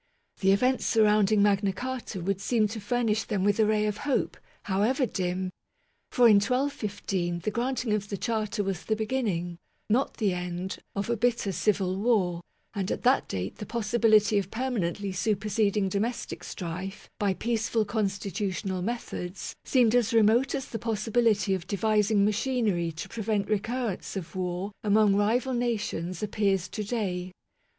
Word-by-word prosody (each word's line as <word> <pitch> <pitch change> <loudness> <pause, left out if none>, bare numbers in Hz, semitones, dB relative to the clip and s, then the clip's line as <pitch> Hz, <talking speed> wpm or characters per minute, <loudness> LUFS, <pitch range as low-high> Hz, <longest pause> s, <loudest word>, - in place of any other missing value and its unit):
The 195 0 +4
events 255 +6 +2
surrounding 210 -2 +4
Magna 200 -1 +3
Carta 245 -2 -5
would 195 +2 -1
seem 215 0 +2
to 220 +1 -5
furnish 220 0 0
them 200 -3 -1
with 205 +1 +2
a 215 - +5
ray 215 0 +2
of 210 -1 -1
hope, 285 +1 -1 0.3
however 215 +8 +1
dim; 185 -3 -2 0.6
for, 245 -1 +5
in 215 -3 +7
1215, 205 -8 -1
the 215 - -1
granting 240 0 -1
of 205 -1 -2
the 200 - -3
Charter 215 0 -1
was 190 -3 -3
the 220 - +1
beginning, 210 -7 -2 0.3
not 255 +5 +1
the 205 -5 +1
end, 180 +1 -4 0.2
of 200 0 -2
a 235 - +1
bitter 235 -3 +1
Civil 185 +1 0
War; 195 -6 +1 0.3
and 195 -2 -2
at - - -3
that 255 +2 +3
date 95 0 -4
the 210 - -6
possibility 220 -2 +3
of 195 -2 -4
permanently 205 -6 -2
superseding 205 +1 +1
domestic 210 +6 -3
strife 180 +3 -6
by 200 -2 +1
peaceful 225 0 0
constitutional 200 -2 -2
methods 195 -4 -4
seemed 240 -4 +3
as 235 -2 +2
remote 230 +5 +4
as 270 -2 -3
the 225 - -6
possibility 225 -2 +1
of 185 -3 -3
devising 210 0 +2
machinery 210 -6 0
to 160 - -6
prevent 210 -2 -1
recurrence 220 0 -2
of 190 -3 -6
war 185 +2 -2
among 210 -1 +4
rival 235 +6 +1
nations 210 -7 -2
ap 210 - -3
pears 195 -4 +1
to 210 +3 -4
day. 190 -5 -2
210 Hz, 155 wpm, -28 LUFS, 190-230 Hz, 0.6 s, in